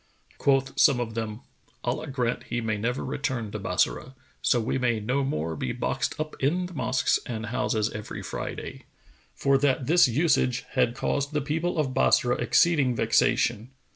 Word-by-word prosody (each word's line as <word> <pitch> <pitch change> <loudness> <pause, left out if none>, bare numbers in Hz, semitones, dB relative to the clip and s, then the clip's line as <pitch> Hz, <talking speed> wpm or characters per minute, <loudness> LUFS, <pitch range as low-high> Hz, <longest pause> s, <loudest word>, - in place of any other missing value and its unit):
Quoth 135 -1 +1
some 140 -4 +5
of 115 -2 -3
them, 110 0 -4 0.4
"Allah 145 +6 -2
grant 125 -3 -2
he 120 - -2
may 110 -2 -1
never 115 +5 -2
return 125 -7 -3
to - - -5
Bassorah, 130 - -1 0.3
so 120 - +3
we 115 +3 -1
may 120 -3 +1
no 125 +6 0
more 80 - -2
be 65 - -3
boxed - - -2
up 155 0 -3
in 170 +7 +1
the 180 - -9
mosques 130 -2 +1
and 110 -2 -4
houses 110 -1 -1
every 105 0 -7
Friday!"; - - -6 0.5
for 140 -1 +2
that 135 -2 +1
this 170 +2 +5
usage 130 -2 +1
had 120 0 +1
caused 140 +2 -1
the 150 - +1
people 160 +5 -2
of 140 -4 0
Bassorah 125 -1 +3
exceeding 140 0 +3
vexation. 115 0 +2
130 Hz, 170 wpm, -26 LUFS, 115-140 Hz, 0.5 s, some